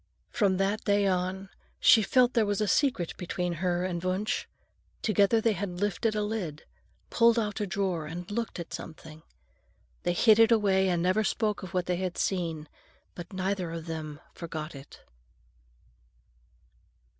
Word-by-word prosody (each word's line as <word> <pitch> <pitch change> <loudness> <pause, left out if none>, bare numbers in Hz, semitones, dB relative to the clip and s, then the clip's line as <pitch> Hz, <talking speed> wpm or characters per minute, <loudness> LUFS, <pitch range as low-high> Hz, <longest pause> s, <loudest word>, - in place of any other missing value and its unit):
From 200 -5 +2
that 195 +3 0
day 205 -1 +2
on, 190 +1 -1 0.3
she 225 - +7
felt 250 +4 +3
there 230 - +3
was 205 0 0
a 210 - +1
secret 200 - +1
between 180 0 -2
her 180 -1 0
and 175 -2 -3
Wunsch. 185 +3 -1 0.6
Together 215 +1 +3
they 220 0 +2
had 190 -3 -4
lifted 205 +2 0
a 210 - 0
lid, 195 -8 -4 0.5
pulled 235 0 +4
out 210 -1 -1
a 205 - -1
drawer, 185 -5 -2
and 175 +5 -7
looked 230 -3 -3
at 170 - -7
something. 160 -1 -9 0.8
They 175 - 0
hid 215 +4 +5
it 225 0 +6
away 195 -4 +3
and 175 -1 0
never 185 +4 +2
spoke 210 -1 -1
of 185 0 -8
what 180 -1 +1
they 180 -1 -1
had 185 -1 -3
seen; 165 -5 -2 0.5
but 175 0 -9
neither 190 -2 -2
of 165 -1 -6
them 155 -3 -6
forgot 160 -2 -6
it. 135 -1 -12
190 Hz, 160 wpm, -28 LUFS, 175-210 Hz, 0.8 s, she